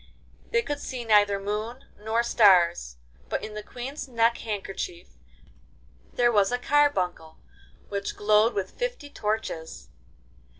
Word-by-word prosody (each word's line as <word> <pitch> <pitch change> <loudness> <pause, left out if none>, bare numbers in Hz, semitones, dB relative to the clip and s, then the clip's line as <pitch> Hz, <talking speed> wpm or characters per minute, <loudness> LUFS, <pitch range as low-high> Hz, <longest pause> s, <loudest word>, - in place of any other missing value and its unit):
They 465 0 +2
could 290 -7 -3
see 250 -4 -6
neither 205 -2 +4
moon 215 +5 -4
nor 220 +2 0
stars, 175 - +4 0.3
but - - -2
in 215 - -8
the 210 - -5
Queen's 255 +7 -7
neck 235 -1 +2
handkerchief 195 -5 -5 1.0
there 240 -1 +3
was 205 -1 +3
a 245 - +1
carbuncle 195 - +1 0.5
which 200 0 -4
glowed 215 +2 +3
like 200 -2 0
fifty - - -5
torches. 210 - -4
215 Hz, 125 wpm, -26 LUFS, 200-245 Hz, 1.0 s, neither